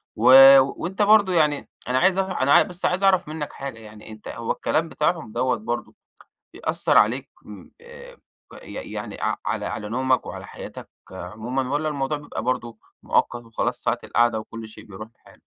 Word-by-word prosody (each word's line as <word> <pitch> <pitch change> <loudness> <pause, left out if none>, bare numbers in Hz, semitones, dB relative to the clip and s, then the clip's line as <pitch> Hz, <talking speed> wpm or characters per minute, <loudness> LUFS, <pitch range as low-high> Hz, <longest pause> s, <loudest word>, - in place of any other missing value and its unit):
و 110 - -3 0.4
وأنت 175 +9 -3
برضو 205 -2 +5
يعني 150 -4 +1 0.2
أنا 125 +1 +1
عايز 185 +5 +3
أع 190 -1 -2
أنا 140 +2 +6
بس 180 -3 -7
عايز 185 +2 0
أعرف 190 -4 +3
منك 155 -1 -6
حاجة 135 -4 -7
يعني 105 0 -13
أنت 110 -1 -12
هو 115 0 -4
الكلام 165 +1 -1
بتاعهم 165 -10 -1
دوّة 130 +3 0
برضه 220 - -5 0.6
بيأثر - - +1
عليك - - +1
م - - -12
آآ، 480 +1 -13 0.5
ي - - -11 0.2
يعني - - -7
اع - - 0
على - - -2
على 105 -2 -5
نومك 130 +3 0
وعلى - - -8
حياتك - - -10 0.2
عمومًا، 110 +8 -4
والّا 155 +1 0
الموضوع 145 0 -2
بيبقى 145 -6 -7
برضه، 120 -2 -3 0.2
مؤقت 120 0 0
وخلاص 115 -1 -3
ساعة - - 0
القعدة 120 -1 +1
وكل 110 +1 -9
شيء 110 - -13
بيروح 105 +2 -10
لحاله؟ - - -21
130 Hz, 175 wpm, -23 LUFS, 115-175 Hz, 0.6 s, أنا